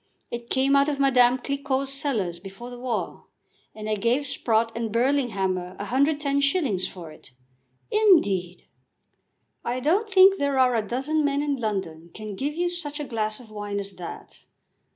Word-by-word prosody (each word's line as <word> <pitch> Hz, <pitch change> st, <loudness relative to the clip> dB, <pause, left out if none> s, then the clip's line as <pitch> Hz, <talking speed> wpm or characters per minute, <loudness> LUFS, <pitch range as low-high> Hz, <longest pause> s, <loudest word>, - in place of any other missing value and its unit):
It 235 Hz, 0 st, -6 dB
came 270 Hz, +1 st, +2 dB
out 280 Hz, +1 st, +4 dB
of 285 Hz, -2 st, -2 dB
Madame 250 Hz, -2 st, +4 dB
Cliquot's 275 Hz, 0 st, -1 dB
cellars 215 Hz, -, -1 dB
before 195 Hz, +6 st, -10 dB
the 245 Hz, -, -9 dB
war, 245 Hz, -3 st, -4 dB, 0.5 s
and 215 Hz, 0 st, -7 dB
I 215 Hz, -, 0 dB
gave 235 Hz, +7 st, +1 dB
Sprott 230 Hz, -4 st, +1 dB
and 230 Hz, -2 st, -3 dB
Burlinghammer 205 Hz, -8 st, 0 dB
110s. 280 Hz, -, +1 dB
for 170 Hz, -4 st, -10 dB
it." 155 Hz, -, -15 dB, 0.6 s
"Indeed!" 205 Hz, -, +3 dB, 1.0 s
"I 245 Hz, +2 st, -2 dB
don't 370 Hz, -, +1 dB
think 385 Hz, 0 st, +6 dB
there 280 Hz, -1 st, 0 dB
are 255 Hz, -1 st, +4 dB
a 230 Hz, -, +2 dB
dozen 285 Hz, +6 st, 0 dB
men 285 Hz, 0 st, +1 dB
in 290 Hz, -1 st, 0 dB
London 190 Hz, -9 st, -4 dB
can 215 Hz, -2 st, -7 dB
give 285 Hz, +8 st, -3 dB
you 350 Hz, +1 st, 0 dB
such 325 Hz, -4 st, -5 dB
a -, -, -2 dB
glass 215 Hz, -3 st, -2 dB
of 230 Hz, -4 st, -15 dB
wine 205 Hz, -1 st, -4 dB
as 200 Hz, 0 st, -6 dB
that. 175 Hz, -2 st, -9 dB
250 Hz, 160 wpm, -25 LUFS, 210-280 Hz, 1.0 s, think